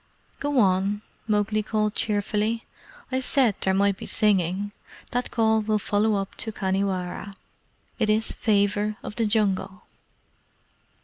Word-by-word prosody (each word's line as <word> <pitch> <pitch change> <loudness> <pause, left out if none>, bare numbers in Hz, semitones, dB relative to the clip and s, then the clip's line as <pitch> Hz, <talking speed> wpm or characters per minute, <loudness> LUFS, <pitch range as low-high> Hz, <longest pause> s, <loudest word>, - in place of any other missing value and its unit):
"Go 290 -1 -1
on," 200 +1 +2 0.2
Mowgli 215 0 +1
called 215 0 0
cheerfully. 210 +2 0 0.5
"I 260 - +1
said 260 -3 +2
there 190 - +2
might 200 0 +2
be - - -7
singing. 200 -1 +1 0.4
That 245 +1 -1
call 220 -1 +2
will 215 0 +1
follow 210 +1 +1
up 195 -1 -3
to 220 - -2
Khanhiwara. 190 -1 -2 0.6
It 220 -2 +2
is 215 +1 +2
Favour 210 -1 +1
of 210 - -6
the 225 -2 +1
Jungle." 205 -2 0
210 Hz, 130 wpm, -25 LUFS, 200-220 Hz, 0.6 s, on